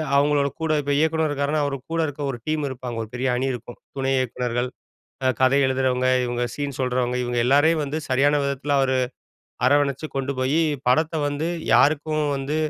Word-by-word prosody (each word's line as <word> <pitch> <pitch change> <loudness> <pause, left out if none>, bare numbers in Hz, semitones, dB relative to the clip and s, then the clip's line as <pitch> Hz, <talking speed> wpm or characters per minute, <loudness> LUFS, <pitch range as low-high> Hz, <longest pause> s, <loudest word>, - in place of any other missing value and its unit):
அவுங்களோட 145 0 +3
கூட, 160 -1 0
இப்ப 145 0 -2
இயக்குனர் 160 +1 +2
இருக்காருன்னா 145 +1 0
அவர் 140 -1 -2 0.2
கூட 165 - -1
இருக்கிற 145 -1 -4
ஒரு 125 - -6
டீம் 155 -1 0
இருப்பாங்க. 125 -2 -6
ஒரு 110 - -10
பெரிய 125 +2 -1
அணி 130 +2 0
இருக்கும். 120 0 -8 0.2
துணை 135 0 0
இயக்குனர்கள், 125 -1 -1 0.7
கதை 130 +2 +4
எழுதுறவங்க, 130 -1 +1 0.2
இவங்க 120 0 -2
சீன் 145 -2 -4
சொல்றவங்க, 125 -1 0
இவங்க 120 0 -2
எல்லாரையும் 150 +5 +4
வந்து 145 +2 -3
சரியான 140 +3 +3
விதத்தில 140 +1 -1
அவரு 130 -1 +2 0.7
அரவணைச்சு 145 +1 +2
கொண்டு 135 +1 -1
போய் 135 +5 +1 0.3
படத்த 155 +6 +2
வந்து 145 +2 -2 0.3
யாருக்கும் 155 +1 +3
வந்து 135 +3 -2
140 Hz, 165 wpm, -23 LUFS, 130-145 Hz, 0.7 s, கதை